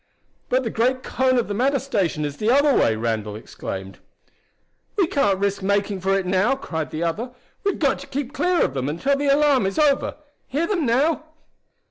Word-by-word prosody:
"But 255 +1 +2
the 225 - -3
great 255 +3 +1
cone 255 -1 +1
of 240 - +1
the 205 - -3
matter 265 +6 +2
station 195 - -1
is 145 0 -5
the 215 - 0
other 280 +2 +4
way!" 110 - +3
Randall 110 -2 -2
exclaimed. 95 -3 -7 1.0
"We 395 -4 +3
can't 275 - +1
risk 200 +1 -1
making 200 0 0
for 195 +1 +2
it 190 - -2
now!" 190 +8 +2
cried 160 - -4
the 155 +4 -3
other. 220 +10 -2 0.3
"We've 400 -2 0
got 280 -4 +1
to - - -10
keep 280 0 -4
clear 360 -1 +2
of - - -3
them 135 0 -2
until 265 - +1
the 285 +1 -1
alarm 280 -6 +4
is 195 - -4
over. 290 -3 +2 0.3
Hear 295 +6 0
them 340 - 0
now?" 295 +7 +2
235 Hz, 195 wpm, -22 LUFS, 180-280 Hz, 1.0 s, other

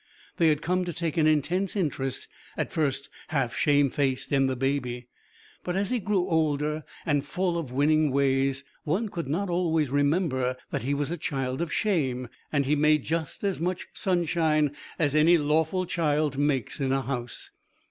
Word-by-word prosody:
They 165 - +4
had 155 0 +2
come 180 +1 +1
to 175 - -4
take 165 -1 -2
an 155 -1 +4
intense 170 +6 +1
interest, 140 -8 -2 0.3
at - - -2
first 140 -3 0 0.2
half 135 -6 -1
shamefaced, 140 -2 +2
in 135 -1 +3
the 130 - -1
baby. 125 -2 -2 0.5
But 180 - -2
as 200 +2 0
he 250 - +1
grew 195 -3 0
older 155 -2 0 0.2
and 145 -3 +1
full 180 +4 -1
of 165 -7 -3
winning 150 +3 +3
ways, 135 0 +1 0.2
one 190 +9 0
could 170 -7 -4
not 175 +8 -1
always 165 -5 +1
remember 145 -3 +1
that - - -1
he 140 +5 0
was 145 +2 -2
a 175 - -2
child 135 -2 -2
of 170 -2 -2
shame, 130 - 0 0.2
and 145 -2 +1
he 145 +3 +2
made 150 -1 +3
just 160 +1 -3
as 195 -4 -1
much 180 +1 -2
sunshine 160 -5 +1 0.2
as 145 -4 +1
any 160 +3 +6
lawful 160 +5 +1
child 150 -4 0
makes 140 -2 0
in 135 -2 0
a 135 0 +1
house. 125 -3 -5
150 Hz, 175 wpm, -27 LUFS, 135-170 Hz, 0.5 s, any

